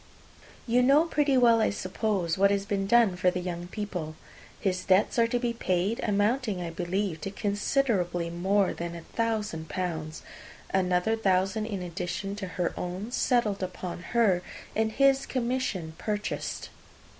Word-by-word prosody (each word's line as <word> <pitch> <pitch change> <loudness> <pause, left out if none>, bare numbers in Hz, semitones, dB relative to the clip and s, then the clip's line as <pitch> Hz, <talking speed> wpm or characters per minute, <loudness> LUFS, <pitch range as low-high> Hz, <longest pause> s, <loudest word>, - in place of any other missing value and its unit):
You 245 +1 +3
know 275 +5 +5
pretty 290 -5 +2
well, 235 -2 +5
I - - +3
suppose, 190 -3 -1
what 200 +1 +4
has 200 0 0
been 200 -2 -1
done 230 -4 +5
for 180 0 +3
the 180 0 -2
young 175 -1 -4
people. 180 -6 -5 0.4
His 185 -2 -1
debts 190 +5 +3
are 230 - +5
to 245 - 0
be 240 -1 -1
paid, 190 0 0
amounting, 210 +1 +1
I 170 -1 -4
believe, 175 0 -2
to 195 - -3
considerably 200 -4 0
more 190 +3 +1
than 170 0 -5
a 170 - -7
thousand 210 -9 -2
pounds, 160 -2 -4 0.5
another 185 +3 +2
thousand 195 +1 +1
in 200 -4 -4
addition 180 +3 -4
to 195 -2 -4
her 180 -1 -2
own 185 +6 -4
settled 235 -6 +1
upon 180 -1 -5 0.2
her, 195 -7 +4 0.3
and 220 0 +1
his 275 +2 +3
commission 240 -10 -2
purchased. 210 -1 -3
195 Hz, 155 wpm, -28 LUFS, 180-225 Hz, 0.5 s, know